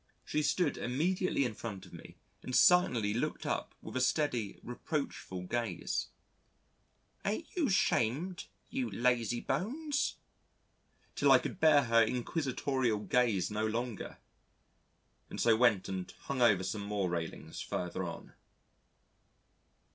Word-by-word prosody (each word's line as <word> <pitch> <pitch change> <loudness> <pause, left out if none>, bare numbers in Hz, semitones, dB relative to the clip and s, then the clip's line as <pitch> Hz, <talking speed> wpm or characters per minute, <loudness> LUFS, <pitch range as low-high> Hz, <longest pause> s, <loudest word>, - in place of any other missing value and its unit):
She 150 - 0
stood 150 +1 +1
immediately 160 +4 0
in 120 - -2
front 100 -3 -7
of - - -16
me - - -11 0.3
and 130 - -4
silently 125 - +5
looked 115 - -2
up - - -2
with - - -8
a 130 - +1
steady 125 -6 0
reproachful 125 - -4
gaze: 110 -1 -2 1.2
"Ain't 215 +11 -3
you 320 -8 +1
'shamed, 175 - +1 0.2
you 260 0 -1
lazy 120 -1 +1
bones?" 275 - -1 1.0
till - - +4
I - - +9
could - - -5
bear 155 -4 +6
her 115 -1 +4
inquisitorial 130 0 0
gaze 110 -5 +1
no 105 +1 0
longer, 115 -1 -4 1.1
and - - -7
so 115 -2 +5
went 115 -5 +3
and 95 -1 -4
hung 135 -2 -3
over 105 -6 +5
some 100 +2 -3
more 100 -2 -1
railings 85 -2 -4
further 90 -1 -3
on. - - -7
125 Hz, 125 wpm, -32 LUFS, 110-150 Hz, 1.2 s, I